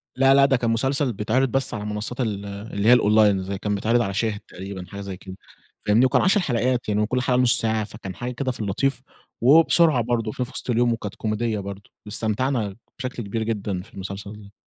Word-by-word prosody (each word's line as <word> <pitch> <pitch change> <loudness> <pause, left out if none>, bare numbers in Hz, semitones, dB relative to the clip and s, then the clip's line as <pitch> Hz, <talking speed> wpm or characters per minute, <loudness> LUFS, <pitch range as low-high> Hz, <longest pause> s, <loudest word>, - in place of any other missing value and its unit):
لا 135 +1 +5
لا 140 0 +6
ده 135 -2 +3
كان 115 -1 -1
مسلسل 135 +3 +1
بيتعرض 115 +6 +1
بس 135 -1 0
على 105 -1 -4
منصات 105 +4 -3
ال 100 -3 -2
اللي 100 +1 -4
هي 125 - +9
الonline، 105 -2 +4
زي 100 0 -3
كان 105 +1 -2
بيتعرض 115 +4 +2
على 100 -4 -2
شاهد 105 0 -1
تقريبًا 95 -1 -8
حاجة 100 0 -8
زي 95 -2 -6
كده 95 -1 -10 0.5
فاهمني؟ 110 +5 +4
وكان - - +3
10 195 +3 +3
حلقات 125 - 0
يعني 105 0 +1
وكل 125 +4 0
حاجة 130 -1 +1
نص 125 0 +4
ساعة، 110 -1 0
فكان 100 -3 -8
حاجة 120 +5 -4
كده 130 +1 -2
في 125 - -9
اللطيف 125 +7 -1 0.4
وبسرعة 155 +1 +5
برضه، 115 -2 -1
شُفناه 125 - -3
في 130 - -13
وسط - - -4
اليوم 120 0 +2
وكانت 105 -3 -6
كوميدية 110 0 -2
برضه 100 0 -8
واستمتعنا 110 0 -1 0.2
بشكل 125 -3 -4
كبير 110 +3 -3
جدًا 100 -4 -2
في 110 - -17
المسلسل 100 +2 -7
ده. 100 0 -15
110 Hz, 215 wpm, -23 LUFS, 100-125 Hz, 0.5 s, هي